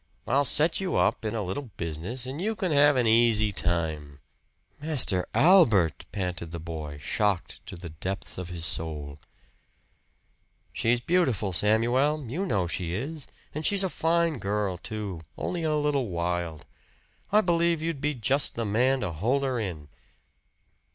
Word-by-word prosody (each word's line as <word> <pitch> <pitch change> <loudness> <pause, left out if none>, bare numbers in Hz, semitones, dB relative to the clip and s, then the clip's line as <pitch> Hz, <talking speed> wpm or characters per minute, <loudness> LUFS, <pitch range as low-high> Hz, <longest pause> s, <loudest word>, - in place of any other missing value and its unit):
"I'll 140 +3 +2
set 155 +7 +3
you 190 -1 -1
up - - +2
in 110 +1 -2
a 110 - -1
little 115 +8 -4
business, 85 - -4
and 135 +5 -5
you 220 +3 -1
can 185 -4 -2
have 145 0 +5
an 125 -2 +2
easy 110 -2 +4
time." 80 -6 -2 0.6
"Master 135 - +1
Albert!" 115 - +5
panted 90 -4 -3
the 85 +1 -6
boy 80 -3 -6
shocked 100 +5 -1
to 100 - -7
the 85 0 -8
depths 95 +4 -5
of 90 -1 -6
his 85 -2 -4
soul. 75 -3 -3 1.5
"She's 120 +2 +1
beautiful, 125 - +1
Samuel 120 - +2
you 175 - -2
know 100 -5 +1
she 85 0 -3
is. 145 - -5 0.3
And 155 - -4
she's 200 +3 +3
a 190 - 0
fine 165 -3 +1
girl, 100 -3 -1
too 105 -6 -5 0.2
only 175 -2 -3
a 155 -1 +1
little 145 -4 +1
wild. 85 -2 -3 0.7
I 210 +1 +6
believe 170 -3 +1
you'd 165 -4 -3
be 150 0 0
just 130 +4 0
the 115 - -2
man 125 +6 +2
to 85 - -2
hold 120 - 0
her 130 -3 0
in." 85 -9 -5
110 Hz, 160 wpm, -27 LUFS, 90-150 Hz, 1.5 s, I